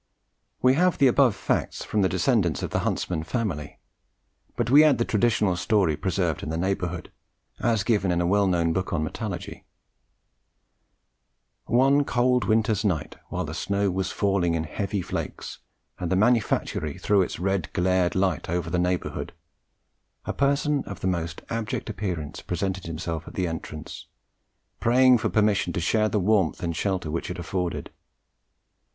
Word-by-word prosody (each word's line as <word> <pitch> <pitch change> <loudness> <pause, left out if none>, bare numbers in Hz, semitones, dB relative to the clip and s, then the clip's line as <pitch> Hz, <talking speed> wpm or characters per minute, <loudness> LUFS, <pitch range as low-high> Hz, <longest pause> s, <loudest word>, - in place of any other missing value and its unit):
We 130 0 +6
have 180 +5 +2
the 140 - +4
above 130 -3 +4
facts - - -2
from 105 - 0
the 95 - +3
descendants 110 - +1
of - - -3
the - - 0
Huntsman 85 -4 -1
family; 80 - -3 0.8
but 120 0 -1
we 145 +3 +8
add 150 -3 +5
the 115 - +1
traditional 105 -4 +2
story 95 -4 +2
preserved 90 -2 -1
in - - -5
the 80 - -2
neighbourhood, 90 -1 -2 0.5
as 115 -4 +1
given 100 -5 +1
in 85 - +1
a 85 - +1
well 100 +2 +3
known 85 -2 +1
book 95 +2 -2
on 80 -2 0
metallurgy: 100 +2 -5 2.0
"One 135 +4 +4
cold 125 -3 +2
winter's 110 -1 +2
night, 90 -8 -1
while 90 0 -2
the 80 - -6
snow 100 +3 0
was 95 +1 -2
falling 95 -4 +1
in 80 - -1
heavy 100 +4 -3
flakes, - - -5 0.4
and 90 -2 -3
the - - +3
manufactory 105 - +1
threw 100 -2 +2
its 90 - -2
red 95 -2 -1
glared 90 -1 +1
light 95 -4 0
over 85 0 -2
the 90 - +1
neighbourhood, 90 0 -2 0.9
a - - -2
person 140 +1 +1
of 100 - -8
the - - -4
most 85 -3 -2
abject 115 -2 -3
appearance 90 -7 -4
presented 95 +1 -3
himself 80 0 -4
at - - -10
the 95 - 0
entrance, 80 -1 -7 0.7
praying 125 +1 +5
for - - 0
permission 105 -2 +2
to 95 - -1
share 110 +6 +2
the 105 - 0
warmth 95 -4 +1
and 85 -1 -2
shelter 95 -4 -1
which 85 - -3
it 90 - -5
afforded. 90 0 -3
95 Hz, 160 wpm, -25 LUFS, 85-110 Hz, 2.0 s, we